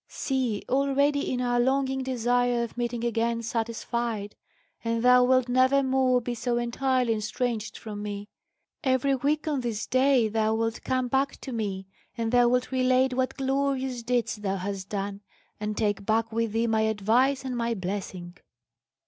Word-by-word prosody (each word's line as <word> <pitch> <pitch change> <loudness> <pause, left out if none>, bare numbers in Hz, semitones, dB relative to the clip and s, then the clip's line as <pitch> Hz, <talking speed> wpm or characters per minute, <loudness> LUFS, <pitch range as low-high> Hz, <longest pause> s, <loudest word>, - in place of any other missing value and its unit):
See, 255 -6 -2
already 280 +1 +1
is 250 -1 -1
our 245 -1 +1
longing 265 +1 +1
desire 245 -1 +1
of 235 - -6
meeting 240 -1 -2
again 230 0 0
satisfied, 230 -2 -3 0.5
and 230 0 -1
thou 250 0 +6
wilt 255 0 +3
never 260 +2 +3
more 260 -1 +3
be 245 0 -4
so 240 +1 -1
entirely 245 0 +1
estranged 220 +1 -3
from 210 -2 -7
me. 205 0 -5 0.6
Every 260 +1 +2
week 295 +4 0
on 290 -4 0
this 225 -3 -3
day 260 -2 +3
thou 220 0 +1
wilt 225 0 -1
come 255 -1 0
back 270 +2 0
to 265 - -6
me, 200 -5 -3 0.3
and 225 -1 -1
thou 245 -1 +5
wilt 250 +1 0
relate 255 0 +2
what 260 +1 -1
glorious 265 -2 -1
deeds 240 -1 -1
thou 195 -2 -2
hast 195 0 -5
done, 200 0 -4 0.4
and 210 0 -3
take 205 -2 0
back 225 +2 +1
with 230 -1 -1
thee 225 +1 +1
my 220 -1 +2
advice 225 +6 +2
and 255 -1 -3
my 235 -1 -1
blessing." 185 -2 -5
240 Hz, 165 wpm, -27 LUFS, 220-260 Hz, 0.6 s, thou